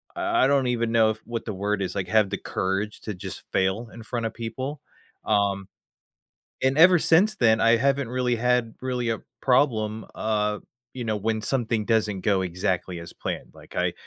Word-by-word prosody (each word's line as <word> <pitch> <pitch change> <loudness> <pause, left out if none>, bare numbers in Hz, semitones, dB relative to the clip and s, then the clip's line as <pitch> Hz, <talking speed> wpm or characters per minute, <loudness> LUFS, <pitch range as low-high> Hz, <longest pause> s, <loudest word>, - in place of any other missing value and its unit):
I 345 0 +2
I - - +4
don't 135 -2 +2
even 115 -2 0
know 110 -1 +4
if 110 - -7
what 115 -1 -5
the 110 - -3
word 100 +1 -1
is 90 - -3
like, 95 -2 -2
have 110 -3 +3
the 100 - -1 0.2
courage 95 +3 -1
to 105 - -5
just - - -7
fail 95 +5 +1
in 115 - -10
front 115 0 -3
of - - -8
people, 130 +5 -5 0.4
um, 100 -2 +1 1.0
and 135 +3 +2
ever 180 +1 +8
since 195 +7 +4
then, 110 -2 +4
I 115 +1 +5
haven't 135 0 +1
really 125 -1 0
had, 125 -1 +1
really, 125 -2 -1
a 110 - -1 0.2
problem, 110 -5 +1
uh, 105 -1 0 0.4
you 125 -2 -5
know, 110 -1 -1
when 110 +1 -1
something 115 -3 0
doesn't 105 -4 +1
go 100 -3 +2
exactly 90 0 -2
as 85 - -9
planned, - - -5
like, - - -14
I - - +1
115 Hz, 190 wpm, -25 LUFS, 105-125 Hz, 1.0 s, ever